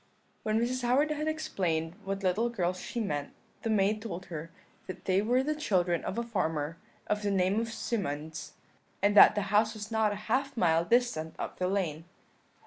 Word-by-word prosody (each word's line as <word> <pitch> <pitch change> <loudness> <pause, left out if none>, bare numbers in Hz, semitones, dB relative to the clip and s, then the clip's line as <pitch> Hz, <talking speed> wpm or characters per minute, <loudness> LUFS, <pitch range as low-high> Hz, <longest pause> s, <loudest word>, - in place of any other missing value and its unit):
"When 215 0 +1
Mrs. 250 +2 0
Howard 265 +5 +2
had 305 +1 -2
explained 175 - -1
what 195 0 -3
little 200 +6 +2
girls 185 -5 -1
she 240 - -5
meant, 145 -10 -2 0.3
the 225 - -2
maid 210 0 +2
told 185 -5 -6
her 160 +1 -5 0.4
that 185 -1 -8
they 190 +1 +3
were 245 +5 +2
the 305 +2 0
children 180 - +1
of 190 - -4
a 235 - 0
farmer 160 -8 -2 0.3
of 210 0 -1
the 205 - 0
name 195 +1 +2
of 230 0 -3
Symonds, 160 -10 -4 0.5
and 205 0 +4
that - - +9
the 205 - +1
house 215 +1 +3
was 210 +1 -7
not 220 -1 +2
a - - -2
half 270 +3 0
mile 165 -4 +3
distant 200 -8 +1
up - - -5
the 180 - +1
lane. 170 -5 -1
205 Hz, 190 wpm, -30 LUFS, 175-230 Hz, 0.5 s, that